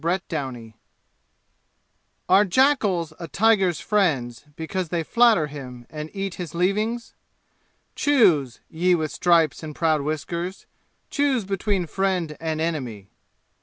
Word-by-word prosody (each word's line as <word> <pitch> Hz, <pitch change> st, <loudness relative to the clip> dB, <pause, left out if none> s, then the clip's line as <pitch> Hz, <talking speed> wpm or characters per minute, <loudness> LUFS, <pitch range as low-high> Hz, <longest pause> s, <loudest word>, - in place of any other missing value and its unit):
Chapter 175 Hz, 0 st, -1 dB, 0.3 s
X 110 Hz, -, -20 dB, 1.5 s
Are 190 Hz, +3 st, +6 dB
jackals 200 Hz, -, +2 dB
a 170 Hz, -, -6 dB
tiger's 195 Hz, -1 st, +2 dB
friends 150 Hz, -, 0 dB
because 165 Hz, +2 st, -4 dB
they 170 Hz, -1 st, -1 dB
flatter 230 Hz, -3 st, +4 dB
him 130 Hz, -4 st, -9 dB
and 155 Hz, 0 st, -6 dB
eat 195 Hz, -2 st, -4 dB
his 170 Hz, -2 st, -7 dB
leavings? 215 Hz, +7 st, -1 dB, 0.8 s
Choose, 175 Hz, -, +3 dB
ye 180 Hz, +3 st, +2 dB
with 155 Hz, -2 st, -2 dB
stripes 170 Hz, -4 st, +2 dB
and 155 Hz, -2 st, -7 dB
proud 155 Hz, -3 st, +1 dB
whiskers, 170 Hz, +5 st, -4 dB, 0.5 s
choose 275 Hz, -7 st, +1 dB
between 195 Hz, -1 st, -1 dB
friend 180 Hz, -2 st, -1 dB
and 160 Hz, -1 st, -2 dB
enemy. 130 Hz, -12 st, -3 dB
170 Hz, 120 wpm, -24 LUFS, 155-195 Hz, 1.5 s, Are